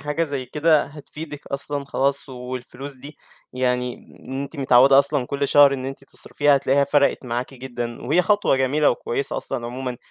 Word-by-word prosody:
حاجة 150 +3 -1
زي 140 -4 -4
كده 150 +3 +2
هتفيدِك 150 +1 -10
أصلًا 140 +1 -3
خلاص 140 +1 0
والفلوس 125 +2 -7
دي 140 +4 -12 0.4
يعني 125 -1 -1 0.3
إن 135 +1 -4
أنتِ 140 +3 -8
متعوّدة 135 0 +6
أصلًا 140 -2 +2
كلّ 140 +1 -2
شهر 140 -1 +6
إن 130 0 -5
أنتِ 135 0 -7
تصرفيها 145 +1 +1
هتلاقيها 140 +1 +2
فرَقِت 140 -1 +2
معاكِ 125 +3 -3
جدًا، 120 -2 -6
وهي 160 +8 +2
خطوة 205 -9 +2
جميلة 140 +3 +2
وكويسة 120 +3 -3
أصلًا 120 - -3
عمومًا 125 0 -5
140 Hz, 165 wpm, -22 LUFS, 130-145 Hz, 0.4 s, متعوّدة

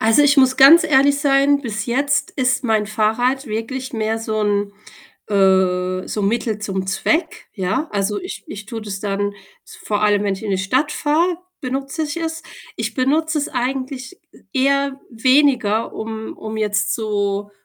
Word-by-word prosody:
Also, 225 +6 +4
ich 290 0 +4
muss 260 -1 +4
ganz 320 +5 +8
ehrlich 280 -1 +4
sein, 280 0 +3
bis 215 -5 -4
jetzt 280 +4 0
ist 260 -1 0
mein 220 -2 +1
Fahrrad 235 +6 0
wirklich 245 +5 -4
mehr 220 0 -1
so 220 -1 -2
'n, 205 -1 0 0.6
äh 185 -2 +2
so 210 - -3
'n 200 - +2
Mittel 225 -2 -1
zum 190 -2 -3
Zweck, 315 - -1
ja. 200 - -1
Also, 205 +1 -1
ich 365 - -8
ich 210 -7 -8
tue 225 0 -6
das 200 -2 -6
dann, 205 0 -2 0.3
s - - -14
vor 210 0 -2
allem, 205 -1 +3
wenn 200 -1 0
ich 190 - -10
in 210 - -3
die 190 - 0
Stadt 260 +10 0
fahre, 330 +4 +1 0.2
benutze 275 +4 -3
ich 300 +2 -4
es. 325 -1 -4 0.3
Ich - - -3
benutze 305 +4 +1
es 290 - -2
eigentlich 260 +5 -4
e - - -20 0.2
eher 275 0 +1
weniger, 245 -3 +2
um 220 0 -6
um 220 0 -6
jetzt 210 -1 0
so 205 -2 -2
225 Hz, 175 wpm, -20 LUFS, 205-275 Hz, 0.6 s, ganz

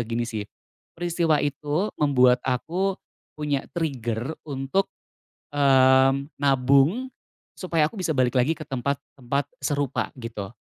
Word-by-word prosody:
gini 120 0 -1
sih. 105 -3 -5 0.5
Peristiwa 170 -3 +1
itu 150 +7 -1
membuat 125 -4 +4
aku 175 +10 -1 0.4
punya 145 -2 -2
trigger 125 -4 -2 0.2
untuk, 135 +8 -1 0.7
mmm, 135 0 +4
nabung 140 - +3 0.4
supaya 165 -5 +1
aku 160 - -8
bisa 185 -5 -2
balik 130 -3 +1
lagi 130 +6 +2
ke 155 - -8
tempat-tempat 140 +1 -3 0.2
serupa 145 -3 -1
gitu. 115 -3 -6
140 Hz, 110 wpm, -25 LUFS, 125-155 Hz, 0.7 s, membuat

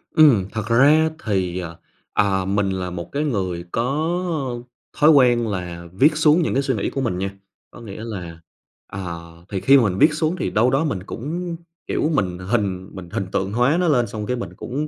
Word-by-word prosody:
Ừm, 140 -12 +6
thật 110 -2 -4
ra 145 +7 +5 0.2
thì, 95 -4 -1
ờ, 85 -2 -7 0.4
à, 95 -2 +1
mình 100 +1 0
là 95 -1 -3
một 85 -1 -7
cái 145 +2 -1
người 95 - -2
có 150 +1 -1 0.4
thói 150 - +5
quen 120 -5 +4
là 90 -4 -5
viết 150 - +3
xuống 155 +2 +4
những 160 - 0
cái 135 - +1
suy 135 -2 0
nghĩ 100 - -1
của 135 - -3
mình 115 -8 -1
nha. 95 +1 -2 0.4
Có - - -13
nghĩa 110 -1 -8
là, 90 -7 -7 0.5
à 95 -3 -5 0.3
thì 100 - -2
khi 140 +1 +6
mà 130 - +4
mình 95 -4 0
viết 150 +6 +5
xuống 155 +2 0
thì - - -1
đâu 115 +4 +2
đó 135 +4 +2
mình 100 - -2
cũng, 165 - -5 0.3
kiểu, 155 - 0
mình 90 -7 0
hình 95 -1 -2
mình 90 -3 -9
hình 95 - -3
tượng 95 +1 -1
hóa 125 +7 +3
nó 180 - +1
lên, 125 -6 +3
xong 105 0 -5
cái 125 - -1
mình 120 - -6
cũng, 145 +5 -4
115 Hz, 210 wpm, -21 LUFS, 95-145 Hz, 0.5 s, Ừm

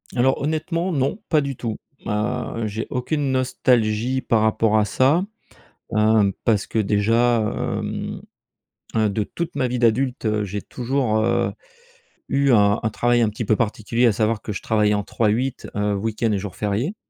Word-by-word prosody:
Alors 130 +2 +2
honnêtement, 165 +4 -1
non, 140 +5 0
pas 155 -2 +4
du 140 -1 -3
tout. 115 -2 -4 0.3
Heu, 105 +1 -2
j'ai 110 +2 -4
aucune 135 +2 -1
nostalgie 125 -1 +1
par 115 -2 +1
rapport 110 0 +2
à 105 - +3
ça, 140 - +2 0.7
hem, 105 -2 +4
parce 105 -3 +2
que 110 - -1
déjà, 115 +4 +2
hem - - -3 0.8
heu 110 -1 +3
de 105 +2 -1
toute 170 +9 -5
ma 130 - +1
vie 125 0 -2
d'adulte, 120 +2 +1
heu, 105 -1 +1
j'ai 100 0 -4
toujours, 125 -3 -1
heu, 115 +2 +1 0.8
eu 140 -1 +2
un 105 -2 +4
un 110 - 0
travail 120 +2 +2
un 110 - +3
petit 110 +2 -5
peu 110 - +3
particulier, 115 +2 0
à - - +5
savoir 110 +1 0
que 105 - -5
je - - -5
travaillais 105 -1 +2
en 105 - 0
3x8, 115 +5 -1
heu, 105 0 0
week-end 110 +2 -1
et 100 - 0
jours 100 -1 -7
fériés. 110 - -1
115 Hz, 170 wpm, -22 LUFS, 105-130 Hz, 0.8 s, à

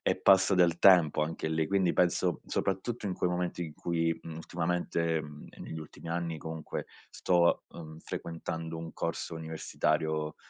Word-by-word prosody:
e - - +2
passa 95 0 +6
del 85 -2 +4
tempo 85 -6 +6
anche 80 0 -3
lì, 80 -1 0
quindi 95 -3 +2
penso 90 0 +2
soprattutto 100 +4 -2
in 95 - -1
quei 90 - 0
momenti 90 0 -2
in 75 - -8
cui, 80 -1 0
mhmm, 80 -1 -7
ultimamente, 85 -1 -1
mhmm, 75 0 -10
e - - -16
negli 80 - -6
ultimi 80 +1 -10
anni 85 -1 -2
comunque 80 0 -5 0.2
sto, 85 -1 +2
mhmm, 80 -1 -9
frequentando 80 0 -5
un 80 -1 -7
corso - - -3
universitario, 80 -1 -1
85 Hz, 160 wpm, -30 LUFS, 80-90 Hz, 0.2 s, passa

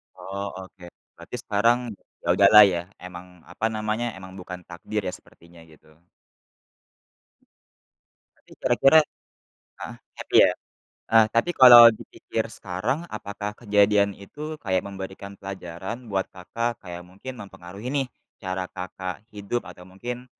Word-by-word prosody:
Oh 100 +1 -6 0.2
oke, 95 -1 -14 0.3
berarti - - -9
sekarang 115 +4 +2 0.4
ya - - -8
udahlah 105 +2 +8
ya, 85 -1 -1 0.2
emang 90 -1 -12
apa 105 - -3
namanya, 110 +2 -2
emang 95 0 -11
bukan 90 0 -8
takdir 85 -1 -5
ya, - - -3
sepertinya 85 0 -16
gitu. 80 0 -21 2.5
Tapi - - -27
kira-kira 150 +4 +5 0.8
heeh, - - -7 0.2
happy - - -2
ya. - - +4 0.6
Heeh 110 -1 +6
tapi 115 +10 +2
kalau 120 -2 +11
dipikir - - -5
sekarang 95 - -2
apakah 105 -1 -5
kejadian 105 -2 +3
itu 150 +10 -8
kayak 95 -3 0
memberikan 95 0 -8
pelajaran 95 +5 -7
buat 95 -1 0
Kakak 115 +5 -4
kayak 90 -1 -8
mungkin 100 +9 -9
mempengaruhi 100 +3 -9
nih, 140 -1 0 0.4
cara 95 -1 -3
Kakak 90 +1 -6
hidup 105 +4 -3
atau 90 0 -12
mungkin, 120 +7 -7
100 Hz, 125 wpm, -24 LUFS, 90-115 Hz, 2.5 s, kalau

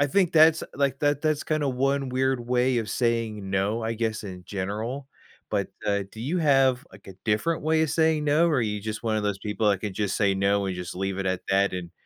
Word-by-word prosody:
I 145 - +4
think 180 +4 +2
that's, 160 0 +6
like, 140 -1 0
that 145 0 +1
that's 155 -1 +1
kinda 155 -2 0
1 135 +1 0
weird 130 0 0
way 125 0 +2
of 110 -3 -3
saying 115 -4 -1
"no," 100 +4 0
I 115 +1 -2
guess, 110 -1 -2
in 90 -2 -8
general. 110 +8 -4 0.4
But, 100 -2 -1 0.2
uh, 100 -1 +1
do 110 - -11
you 160 +9 -1
have, 135 -4 +3
like, - - -16
a 95 - -10
different 115 +11 0
way 160 +1 +2
of 155 - 0
saying 160 -1 +2
"no," 155 +4 +3
or 150 - +1
are - - +2
you 105 -2 -2
just 110 +2 -5
one 110 -1 +1
of 105 - -1
those 100 -1 -1
people 105 +1 -1
that 100 - +1
can 100 -3 -4
just 105 -2 -1
say 100 -2 +2
"no" 100 +1 +1
and 95 - -2
just 90 -1 -6
leave 95 0 -2
it 95 - -2
at 95 -1 -1
that 100 0 +2
and 90 -2 -5
115 Hz, 245 wpm, -26 LUFS, 100-140 Hz, 0.4 s, that's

